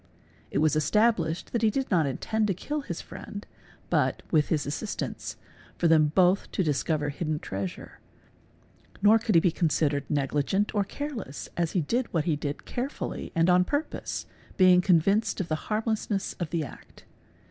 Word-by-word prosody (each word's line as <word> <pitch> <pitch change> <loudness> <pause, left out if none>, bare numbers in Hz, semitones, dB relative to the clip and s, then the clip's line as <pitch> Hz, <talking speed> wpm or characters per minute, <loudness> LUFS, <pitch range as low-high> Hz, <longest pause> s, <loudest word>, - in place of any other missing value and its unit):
It - - -2
_ - - +3
was 155 -1 +3
established 170 +1 +1
that 235 - +1
he 220 - +4
did 265 +3 -2
not 165 -6 +3
intend 215 - -1
to 195 - 0
kill 295 - -3
his 170 -11 -5
friend 205 0 -9 0.5
but, - - +1
with 155 -3 +3
his 155 -3 +1
j - - -8
assistance, 200 +8 -4 0.4
for 170 - +2
them 155 -2 +5
both 185 +1 +3
to 190 - +1
discover 150 -1 0
hidden 155 +1 -2
treasure, 95 -8 -6 1.0
nor 215 +2 +7
could 220 -3 0
he 165 - +7
be 175 - +3
considered 150 -4 0
negligent 150 +8 0
or 205 -2 +2
careless 230 - -6
as 170 -2 -1
he 180 - +2
did 235 - -1
what 160 -3 0
he 160 - +2
did 145 0 -5
carefully 260 +4 -4
and 165 +1 +3
on 180 0 +5
_ - - -12
purpose, 290 +2 -3 0.3
being 185 -1 +6
convinced 195 +5 +2
of 185 - -3
the 155 0 -3
harmlessness 215 -2 -1
of 170 -3 -2
the 165 0 -1
act. 135 - -12
175 Hz, 180 wpm, -27 LUFS, 155-210 Hz, 1.0 s, nor